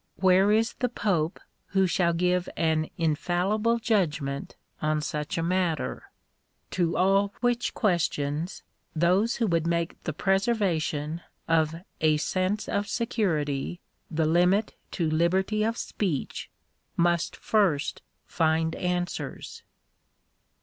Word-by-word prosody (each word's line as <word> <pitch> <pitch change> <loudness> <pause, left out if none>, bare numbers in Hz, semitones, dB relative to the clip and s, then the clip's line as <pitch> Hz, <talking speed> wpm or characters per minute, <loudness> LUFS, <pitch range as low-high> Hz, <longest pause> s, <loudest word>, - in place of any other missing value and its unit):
Where 190 +2 +4
is 225 +2 +2
the 250 - -1
pope 180 -8 0 0.3
who 190 0 +2
shall 175 -1 +2
give 180 +1 +1
an 160 -1 +1
infallible 180 +8 +1
judgment 160 - -1 0.3
on 155 0 +1
such 150 0 -3
a 165 - 0
matter? 170 -7 -1 0.6
To 170 -2 0
all 195 +2 +3
which 245 0 0
questions 160 - 0 0.3
those 185 +8 +3
who 230 - 0
would 165 -4 +1
make 170 -1 -1
the - - 0
preservation 170 -5 0 0.3
of 160 -1 +2 0.2
a 155 -1 +3
"sense 185 +6 -1
of 200 0 -1
security" 175 - -1 0.3
the 160 0 0
limit 180 +6 +3 0.2
to 170 -4 0
liberty 185 +7 +1
of 225 +2 0
speech, 180 -10 -3 0.5
must 170 -1 +2
first 190 -10 +1 0.2
find 160 0 +1
answers. 180 -1 -3
175 Hz, 115 wpm, -27 LUFS, 160-200 Hz, 0.6 s, Where